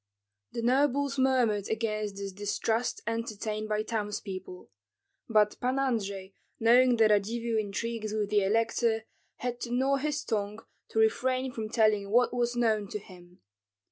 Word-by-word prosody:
The 235 - -3
nobles 275 +2 +2
murmured 245 -6 +2
against 215 -2 -2
this 200 0 -5
distrust 205 +4 -1
entertained 215 -2 -3
by 215 0 0
townspeople; 205 - -5 0.6
but 210 -2 +3
Pan 255 +2 0
Andrei, 200 -7 -2 0.3
knowing 245 +2 +5
the 225 -1 +5
Radzivill 220 +2 +1
intrigues 215 +1 -3
with 210 -1 -2
the 205 -1 +3
elector, 225 +2 +1 0.3
had 245 -1 -4
to 240 - -4
gnaw 265 +3 +2
his 300 +2 -2
tongue 210 0 -3 0.2
to - - -6
refrain 255 +4 +2
from 220 -3 -5
telling 215 -3 +2
what 245 +4 +3
was 240 0 0
known 220 -4 +1
to 210 - -4
him. 180 -3 -15
220 Hz, 140 wpm, -29 LUFS, 210-245 Hz, 0.6 s, knowing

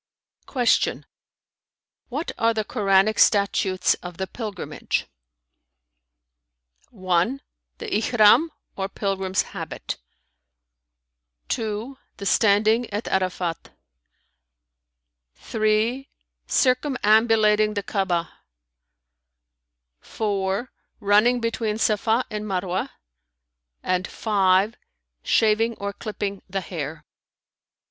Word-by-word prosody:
Q 245 -4 +1 1.1
"What 290 +7 -3
are 230 0 +2
the 215 -1 -1
Koranic 195 +1 +2
statutes 195 -2 +3
of 180 -1 -8
the 190 - -2
Pilgrimage?" 205 -2 -4 1.8
"(1) 185 +4 0 0.4
The 465 - -7
Ihrαm 240 - +4 0.3
or 195 0 -3
pilgrim's 195 -2 -1
habit; - - -5 1.5
(2) 225 +5 -3 0.2
the 200 - -7
standing 215 +4 +3
at 205 +2 -4
Arafat; 185 -3 -2 1.6
(3) 220 +4 0 0.4
circumambulating 220 -5 +3
the 205 - -2
Ka'abah; 180 -5 -1 1.7
(4) 200 +2 -2 0.3
running 215 +4 +4
between 230 -2 -1
Safα 220 +2 +1
and 210 0 -4
Marwah[FN#322]; 185 -1 -2 0.9
and 185 0 0
(5) 200 0 +2 0.5
shaving 225 - +2
or 200 -1 -5
clipping 200 -2 -5
the 195 +1 -2
hair." 160 -3 -6
210 Hz, 80 wpm, -24 LUFS, 190-225 Hz, 1.8 s, Ihrαm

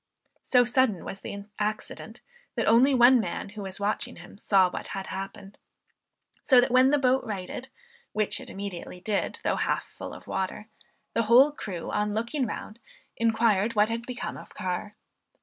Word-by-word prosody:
So 250 -1 +4
sudden 240 -6 +1
was 195 - -6
the 200 0 -7
accident, 215 +1 -4 0.3
that - - 0
only 255 +5 +5
one 245 +1 +7
man, 220 - -3
who 210 +1 -8
was 190 0 -6
watching 205 +1 -1
him, - - -13
saw 195 -2 +4
what 180 - -6
had 195 - -4
happened; 195 +1 -7 0.8
so 255 -3 +6
that 245 - +2
when 255 +1 +6
the 295 - +4
boat 260 -1 +2
righted, 215 +4 -5 0.4
which 215 -1 0
it - - -8
immediately 190 -2 -6
did, 200 +2 -1
though - - +1
half - - 0
full - - -9
of - - -13
water, 200 +3 -3 0.4
the 230 - +2
whole 260 +5 +7
crew 190 - -6
on 210 0 0
looking 235 +4 -1
round 215 +1 -7 0.4
inquired 225 -1 +2
what 210 +1 +4
had 235 +1 -4
become 250 -1 -5
of - - -13
Carr. 185 +2 -4
215 Hz, 170 wpm, -27 LUFS, 200-245 Hz, 0.8 s, one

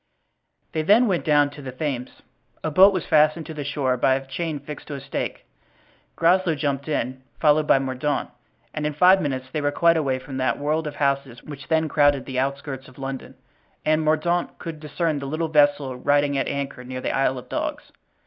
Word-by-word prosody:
They 160 - -1
then 210 +10 +5
went 185 -4 0
down 145 -2 +3
to 145 - -11
the 135 -2 -6
Thames. 130 -2 -5 0.4
A 160 - -1
boat 190 +6 +7
was 185 -4 -2
fastened 155 +1 +3
to 160 - -7
the 150 -1 -5
shore 135 -3 -1
by 130 +2 +3
a 135 0 -4
chain 160 +3 -3
fixed 145 +1 -9
to 145 - -5
a - - -5
stake. 135 0 -5 0.7
Groslow 175 0 +3
jumped 140 -1 -2
in, 130 -3 -2 0.2
followed 150 -1 +3
by - - +6
Mordaunt, 135 +2 -2 0.4
and 150 -1 -2
in 150 - -3
five 185 +4 +6
minutes 130 -2 -3
they 155 - -2
were 145 - +1
quite 170 +2 +3
away 135 -4 0
from 130 +1 -8
that 130 0 0
world 155 +2 -1
of 145 - -6
houses 140 -4 -1
which 140 -2 -10
then 160 0 +2
crowded 145 -2 +3
the 130 -2 -3
outskirts 135 0 -3
of 130 - -17
London; 135 -1 -6 0.5
and 155 +1 +3
Mordaunt 160 +3 0
could 165 -2 -7
discern 150 +1 -2
the 140 - -5
little 160 +3 -2
vessel 145 -3 +3
riding 145 +2 +2
at 135 - 0
anchor 140 -2 -4
near 130 +1 -6
the - - -2
Isle 135 -1 +1
of 125 - -9
Dogs. - - -4
145 Hz, 205 wpm, -23 LUFS, 135-155 Hz, 0.7 s, boat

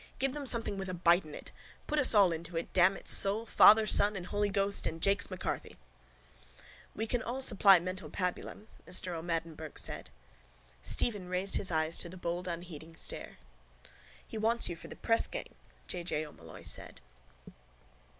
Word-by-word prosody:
Give 270 0 -1
them 290 -2 0
something 225 -5 +2
with 190 -1 -5
a 185 - -3
bite 175 0 +3
in 150 - -10
it. - - -10 0.3
Put 305 - 0
us 265 -5 +5
all 195 -4 +6
into 165 +1 -5
it, 165 - -5
damn 185 +1 +4
its - - +1
soul. 205 +3 +3
Father, 215 -1 +7
Son 210 0 +4
and 185 -2 -5
Holy 205 +2 -1
Ghost 200 0 -1
and 165 - -5
Jakes 200 +4 +1
M'Carthy. 185 -2 -5 1.2
—We 220 - -2
can 240 +1 -1
all 255 +3 -4
supply 200 -5 +6
mental 185 +2 -5
pabulum, 180 +3 -4 0.2
Mr 185 0 -1
O'Madden 165 -1 -3
Burke 155 -1 -10
said. - - -3 0.7
Stephen 200 - 0
raised 185 +2 0
his 190 - +2
eyes 160 -1 -1
to 170 - -3
the 185 - -10
bold 175 +1 -4
unheeding 165 -2 -7
stare. - - -6 0.9
—He 220 - -6
wants 230 0 +1
you 175 - -4
for 165 - -11
the - - -9
pressgang, 230 -1 0 0.3
J. 175 -1 -4
J. 155 -2 -2
O'Molloy 85 - -13
said. - - -7
185 Hz, 175 wpm, -31 LUFS, 170-210 Hz, 1.2 s, Father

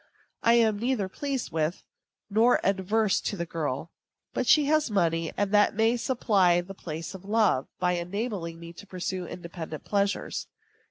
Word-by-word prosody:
I 230 - +5
am 220 -3 +3
neither 235 -4 0
pleased 270 - -3
with 160 +1 -1 0.4
nor 225 +4 +4
averse 195 +2 +1
to 200 - -3
the 170 - -2
girl; 155 -1 -3 0.4
but - - -1
she 300 -2 +6
has 305 -1 +2
money, 165 -5 +1
and 205 -1 0
that 205 -1 +4
may 225 +2 +3
supply 205 -8 +2
the 180 +2 -6
place 165 -1 -6
of 190 -1 -10
love, 205 - +2
by 180 0 +1
enabling 180 -1 -3
me 170 0 -9
to 185 +4 -12
pursue 185 -1 -4
independent 170 -3 -7
pleasures. 200 -1 -1
195 Hz, 160 wpm, -27 LUFS, 170-220 Hz, 0.4 s, she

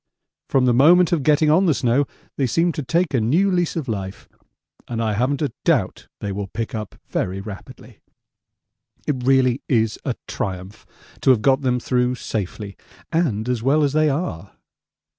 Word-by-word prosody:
From 130 -2 +3
the 125 - +3
moment 170 +8 +5
of 170 -4 +1
getting 150 +2 +3
on 180 +5 +4
the 155 - +3
snow 125 +3 +1 0.3
they 135 - 0
seemed 165 +7 +1
to 155 - -3
take 170 +4 0
a 125 - +2
new 170 - +2
lease 175 -2 0
of 155 -5 -3
life, 100 -4 -5 0.6
and 115 - -4
I 110 -2 0
haven't 130 +7 0
a 145 - -1
doubt - - 0
they 100 - -3
will 100 0 -4
pick 115 +4 -5
up 110 -3 -5
very 95 +2 -2
rapidly. 100 0 -11 1.1
It 145 - 0
really 130 -1 +3
is 110 -4 +1
a - - -2
triumph 95 +2 -5 0.3
to - - +2
have 120 -5 +4
got 135 +2 +3
them 125 -2 +1
through 125 0 0
safely 100 -3 -5 0.4
and 130 -10 0
as 125 -3 -1
well 145 +5 +3
as 140 -1 +1
they 155 0 +3
are. 120 - -4
125 Hz, 180 wpm, -21 LUFS, 110-150 Hz, 1.1 s, moment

